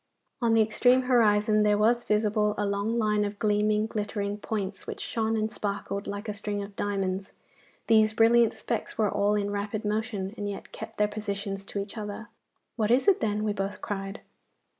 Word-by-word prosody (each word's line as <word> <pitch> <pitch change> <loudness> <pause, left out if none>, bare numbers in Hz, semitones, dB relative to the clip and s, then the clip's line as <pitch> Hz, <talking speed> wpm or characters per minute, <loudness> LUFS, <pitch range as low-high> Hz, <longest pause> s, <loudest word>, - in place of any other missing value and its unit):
On 230 -1 +3
the 225 -1 +6
extreme 245 +4 +3
horizon 215 -4 +4
there 210 0 +3
was 235 +3 +3
visible 210 0 +1
a 205 - 0
long 200 +3 -1
line 210 -2 +2
of 205 0 -3
gleaming, 210 0 +2
glittering 205 -1 -3
points, 200 -3 -4
which - - -5
shone 225 -1 -1
and 215 0 -1
sparkled 200 -1 -4
like 205 +2 -5
a 210 - -2
string 205 0 -3
of 200 0 -10
diamonds. 195 -1 -2 0.5
These 220 -1 +4
brilliant 230 +1 +4
specks 230 - -3
were 215 -2 +2
all 205 +1 +2
in 205 -1 -1
rapid 205 +1 -3
motion, 210 -2 -2
and 205 0 -3
yet 200 - -7
kept 220 0 -8
their 210 - +3
positions 200 -1 -4
to 200 - -4
each 200 +3 -5
other. 210 +2 -6 0.5
'What 215 -2 +1
is 250 - +3
it, 395 - +5
then?' 210 -1 0
we 210 -1 0
both 195 0 -3
cried. 195 +1 -5
210 Hz, 185 wpm, -27 LUFS, 205-220 Hz, 0.5 s, the